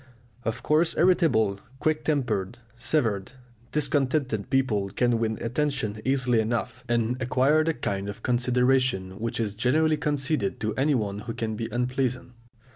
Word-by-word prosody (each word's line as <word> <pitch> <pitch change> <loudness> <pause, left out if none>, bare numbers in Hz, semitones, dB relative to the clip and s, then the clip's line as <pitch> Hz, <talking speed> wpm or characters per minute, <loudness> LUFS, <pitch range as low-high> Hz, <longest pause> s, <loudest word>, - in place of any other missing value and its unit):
Of 115 - -3
course 160 +2 +2
irritable, 155 - +3 0.2
quick 155 +1 0
tempered, 120 -8 -1 0.2
severe, 115 -6 0 0.5
discontented 135 -6 0
people 110 -7 +1
can 120 +2 +1
win 110 -1 -1
attention 120 -4 -2
easily 125 -3 +2
enough, 120 +2 -2
and 120 +2 0
acquire 135 +5 +3
the 165 0 0
kind 100 0 -3
of 105 - -8
consideration 125 -5 +1
which 115 +1 -3
is 105 -3 -1
generally 155 +8 +2
conceded 145 -7 -1
to 110 0 -1
anyone 120 -8 0
who 115 +2 -6
can 110 -1 -2
be 115 +1 -4
unpleasant. 125 0 -1
125 Hz, 135 wpm, -26 LUFS, 110-140 Hz, 0.5 s, irritable